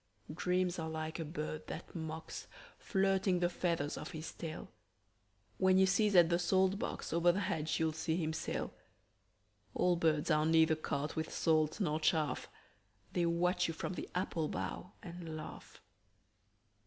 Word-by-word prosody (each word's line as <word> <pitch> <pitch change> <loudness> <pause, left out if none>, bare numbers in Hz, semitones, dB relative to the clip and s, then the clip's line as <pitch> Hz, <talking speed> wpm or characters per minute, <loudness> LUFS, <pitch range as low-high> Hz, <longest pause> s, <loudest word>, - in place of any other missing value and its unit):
Dreams 180 +1 0
are 160 0 -3
like 160 +1 -4
a - - -1
bird 155 -1 -5
that - - -7
mocks, 160 -1 -6 0.3
Flirting 195 -2 +2
the 175 0 +2
feathers 165 -5 -1
of - - -7
his 155 0 -5
tail. 160 -2 -6 0.9
When 190 0 +5
you 190 - +6
sieze 200 +1 +3
at 170 -2 +7
the 170 0 +2
salt 190 +2 +2
box, - - -4
Over 170 +1 +5
the 190 +3 -1
hedge 160 -4 -1
you'll 160 -1 +2
see 160 +1 -1
him 160 -2 -1
sail. - - -3 1.0
Old 180 -1 +3
birds 160 -1 +2
are 155 0 +3
neither 160 0 +5
caught 150 -1 -3
with 160 0 -2
salt 155 +2 +2
nor 155 -6 +1
chaff: 155 -4 +1 0.6
They 175 -1 +2
watch 180 +2 +2
you 165 - -4
from 185 - -3
the - - -6
apple 170 -3 0
bough 180 +5 -4
and 170 -2 -6
laugh. 155 - -9
165 Hz, 160 wpm, -35 LUFS, 155-180 Hz, 1.0 s, at